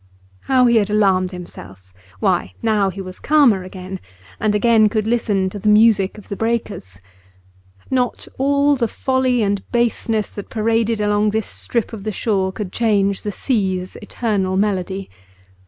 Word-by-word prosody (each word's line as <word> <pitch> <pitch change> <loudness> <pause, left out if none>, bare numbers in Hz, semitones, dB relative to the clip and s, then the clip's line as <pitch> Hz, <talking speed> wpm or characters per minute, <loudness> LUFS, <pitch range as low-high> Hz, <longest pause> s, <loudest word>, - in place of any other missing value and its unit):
How 255 -1 +4
he 235 -1 +4
had 210 -2 +1
alarmed 190 -3 +2
himself! 95 - -11 0.3
Why, 90 0 0
now 210 -3 +2
he 190 +1 -8
was 185 -1 -8
calmer 275 -10 +4
again, 185 0 -8 0.4
and 215 -1 +1
again 220 0 +4
could 215 -1 -1
listen 220 -4 +1
to 205 - -6
the 210 - +1
music 210 -2 +4
of 210 - -13
the 200 - -5
breakers. 215 - -3 0.9
Not 250 -2 -1
all 280 +1 +3
the 240 -3 0
folly 260 0 0
and 200 -1 0
baseness 230 -2 0
that 205 - -8
paraded 225 0 0
along 210 0 +2
this 220 +1 -1
strip 235 -1 -3
of 210 -3 -7
the 215 - -2
shore 195 -2 0
could 195 -2 -6
change 200 -4 +1
the 210 - -3
sea's 190 -6 -2
eternal 205 -4 -2
melody. 195 -1 -1
210 Hz, 155 wpm, -19 LUFS, 190-230 Hz, 0.9 s, How